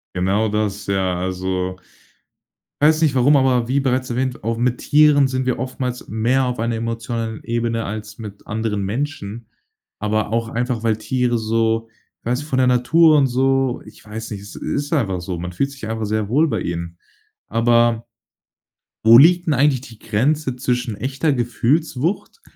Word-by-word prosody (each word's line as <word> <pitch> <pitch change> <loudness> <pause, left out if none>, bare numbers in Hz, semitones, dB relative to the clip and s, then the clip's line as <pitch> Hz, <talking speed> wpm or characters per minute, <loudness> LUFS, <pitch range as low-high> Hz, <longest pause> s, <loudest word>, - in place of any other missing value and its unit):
Genau 95 +4 +1
das, 105 -1 -2
ja, 95 -2 0
also 95 0 -2 1.1
weiß 155 +2 +4
nicht, 150 -4 +2
warum, 135 +3 +5
aber 125 -3 +2
wie 135 +2 +2
bereits 130 -1 0
erwähnt, 125 0 -2
auch 115 +1 -1
mit 125 +1 0
Tieren 150 -2 +4
sind 130 0 -2
wir 125 - -1
oftmals 125 -1 -4
mehr 115 +5 +1
auf 125 -1 -3
einer 115 0 -1
emotionalen 115 -1 -4
Ebene 115 -1 -1
als 110 +1 -6
mit 105 -3 -10
anderen 110 -2 -2
Menschen. 115 -1 -4 0.5
Aber 105 0 -1
auch 115 0 0
einfach, 120 -1 -2
weil 110 -2 +1
Tiere 125 +1 0
so 115 0 0 0.3
ich - - -41
weiß 125 +2 0
nicht 150 +2 -9
von 130 - 0
der 130 -1 +3
Natur 150 +6 +4
und 140 -2 +4
so 135 0 +1
ich 105 - -15
weiß 110 +2 -7
nicht, 100 -2 -5
es 100 - -11
ist 145 +1 -3
einfach 100 - 0
so. 90 0 -4
Man 90 +1 -5
fühlt 140 +10 -1
sich 140 -5 -8
einfach 110 0 -3
sehr 105 0 -1
wohl 150 +9 +2
bei - - -1
ihnen. 85 0 -5 0.5
Aber 115 0 +2 1.0
wo 115 +1 +9
liegt 175 +4 +5
'n 155 - +3
eigentlich 140 -1 +2
die 115 -5 -13
Grenze 130 +5 0
zwischen 125 -3 -2
echter 135 +7 -1
Gefühlswucht 135 - -1
120 Hz, 175 wpm, -20 LUFS, 110-130 Hz, 1.1 s, wo